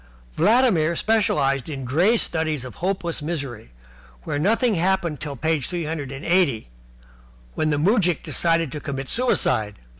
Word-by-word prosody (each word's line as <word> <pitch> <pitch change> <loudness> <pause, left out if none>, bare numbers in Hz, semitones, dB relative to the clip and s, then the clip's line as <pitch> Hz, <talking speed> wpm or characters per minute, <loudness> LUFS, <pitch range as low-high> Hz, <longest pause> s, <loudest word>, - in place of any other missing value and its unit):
Vladimir 180 -4 +3
specialized 150 - +1
in 135 -3 -5
grey 175 - +3
studies 155 - -1
of 125 - -8
hopeless 175 -3 -2
misery, 140 -8 -5 0.5
where 145 - -3
nothing 225 - +2
happened 175 -4 0
till 145 0 -5
page 155 +1 -1
three 175 -3 -3
hundred 150 -3 -4
and 135 +2 -7
eighty, 165 - +2 0.8
when 155 - 0
the 145 - +1
moujik 180 0 +2
decided 165 -4 0
to 150 - -5
commit 135 -1 -5
suicide. 110 - +1
160 Hz, 145 wpm, -23 LUFS, 140-185 Hz, 0.8 s, Vladimir